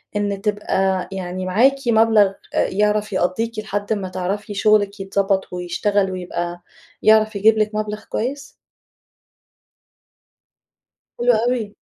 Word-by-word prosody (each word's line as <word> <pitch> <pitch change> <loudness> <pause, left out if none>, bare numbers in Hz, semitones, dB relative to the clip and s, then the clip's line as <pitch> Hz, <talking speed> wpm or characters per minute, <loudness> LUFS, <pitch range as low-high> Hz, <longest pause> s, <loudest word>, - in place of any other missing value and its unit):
إن 205 -1 -1
تبقى 195 -3 0
يعني 185 -1 -5
معاكِ 235 +9 +3
مبلغ 220 -2 +5 0.3
أ - - +2
يعرف 210 +1 0
يقضّيكِ 215 +5 -1
لحد 205 0 -2
ما 195 -3 -4
تعرفي 190 +3 -4
شغلِك 205 0 +2
يتضبط 195 -1 -1
ويشتغل 190 +3 0
ويبقى 175 -1 -4 0.4
يعرف 215 0 +4
يجيب 215 +2 +4
لِك 215 0 0
مبلغ 215 0 -3
كويس؟ 275 +5 -4 2.7
حلو 245 0 +4
أوي. 235 -4 -1
205 Hz, 110 wpm, -20 LUFS, 190-215 Hz, 2.7 s, مبلغ